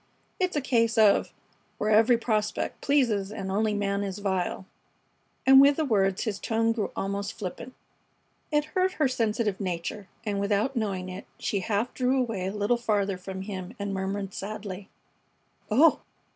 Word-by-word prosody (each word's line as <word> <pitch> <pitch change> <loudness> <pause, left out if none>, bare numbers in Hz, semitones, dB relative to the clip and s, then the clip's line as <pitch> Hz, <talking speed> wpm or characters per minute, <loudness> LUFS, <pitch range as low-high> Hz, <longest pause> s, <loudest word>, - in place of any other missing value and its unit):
It's 365 -2 0
a 295 - +1
case 230 -3 +1
of 215 -2 +4 0.5
'Where 215 - 0
every 225 +3 +5
prospect 215 -2 -1
pleases 230 -9 +1
and 190 -3 -5
only 210 +1 +1
man 200 -1 0
is 195 -1 -3
vile.'" 190 -2 -2 0.8
And 270 0 +9
with 280 +1 +6
the 315 - 0
words 195 -6 +1
his 215 -4 -3
tone 225 0 +1
grew 225 -3 -1
almost 200 +1 -3
flippant. 225 +5 -7 0.8
It 295 -1 +2
hurt 370 0 +2
her 305 -5 +2
sensitive 225 -5 0
nature, 185 +2 -4 0.2
and 205 -2 -1
without 205 +6 0
knowing 195 -5 -2
it 185 +1 -8
she 200 - -1
half 210 +5 -1
drew 260 +1 +1
away 220 -7 -1
a - - -2
little 210 +4 +1
farther 205 -4 0
from 190 +1 -6
him 190 -3 -6
and 200 -1 -3
murmured, 195 0 -3
sadly: 200 -1 -6 0.8
"Oh!" 290 +9 +5
210 Hz, 160 wpm, -27 LUFS, 195-235 Hz, 0.8 s, And